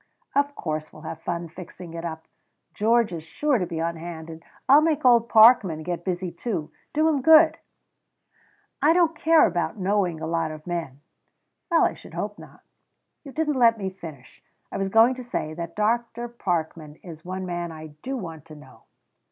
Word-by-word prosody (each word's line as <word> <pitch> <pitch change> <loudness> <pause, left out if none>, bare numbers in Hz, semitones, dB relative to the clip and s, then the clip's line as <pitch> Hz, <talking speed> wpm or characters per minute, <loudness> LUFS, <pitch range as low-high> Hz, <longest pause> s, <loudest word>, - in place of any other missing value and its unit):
"Of 285 0 +1
course 155 -1 -4
we'll 155 - -14
have - - -7
fun 170 0 -3
fixing 175 0 -11
it 165 0 -6
up! 160 -1 -6 0.5
Georgia's 215 -6 +1
sure 275 - 0
to 180 - -2
be 165 -2 -5
on 165 0 -2
hand, 165 -1 -8
and 160 0 -11 0.2
I'll 280 +3 +7
make 310 -3 0
old 235 -2 +5
Parkman 215 -8 +6
get 175 0 -4
busy 180 -1 -3
too 165 -10 -4 0.2
do 310 +1 +2
him 295 -4 +1
good." 320 +3 +6 1.2
"I 310 +2 +5
don't 335 -2 +3
care 320 +1 +5
about 175 +3 -1
knowing 190 -4 0
a 160 - -4
lot 165 0 -1
of 155 0 -9
men 165 -6 -5 0.3
" - - -53
"Well 335 -2 +4
I - - +2
should - - -14
hope - - -4
not" - - -15 0.6
"You 280 - -10
didn't 300 -2 -1
let 230 -2 +5
me 190 -2 -4
finish. 160 -8 -12 0.3
I - - -4
was 195 0 -1
going 225 +5 +5
to 255 0 -8
say 155 -10 -4
that 170 0 -7
Dr. 235 +2 -1
Parkman 165 -9 -3
is 165 -3 -10
one 185 +1 -5
man 175 -1 -4
I 155 -1 -10
do 265 +1 -4
want 165 - -8
to 155 -2 -12
know." 140 -3 -17
180 Hz, 190 wpm, -24 LUFS, 165-240 Hz, 1.2 s, I'll